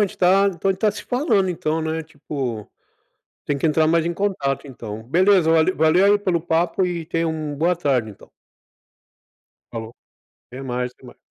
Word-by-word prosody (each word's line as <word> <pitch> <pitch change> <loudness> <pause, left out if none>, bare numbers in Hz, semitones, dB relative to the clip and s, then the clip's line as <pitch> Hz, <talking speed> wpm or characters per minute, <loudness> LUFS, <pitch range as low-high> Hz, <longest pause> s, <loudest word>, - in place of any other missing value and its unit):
gente 200 - -2
tá 195 +2 +4
então 180 +2 -2
a - - +4
gente 190 - -12
tá 215 - +3
se - - -8
falando, 235 - +1
então, 160 -2 -1
né. 160 0 -2
Tipo, 140 -8 -5 0.8
tem 145 - -1
que 140 - -1
entrar 155 0 +3
mais 165 0 +2
em 170 - -1
contato, 160 -8 -2
então. 110 -4 -8
Beleza, 180 - +3
vale 165 +2 +4
valeu 160 +5 +4
aí 205 +1 +5
pelo 185 -4 0
papo, 175 +3 +1
e 170 -2 -3
tenha 165 +1 -1
um 155 -2 -3
boa 170 +5 +1
tarde, 135 -9 0
então. 100 - -15 1.4
Falou. 115 -1 -6 0.6
Até 130 +2 -9
mais, 125 -1 -3
até 130 - -20
mais. 125 - -14
160 Hz, 185 wpm, -22 LUFS, 140-180 Hz, 1.4 s, aí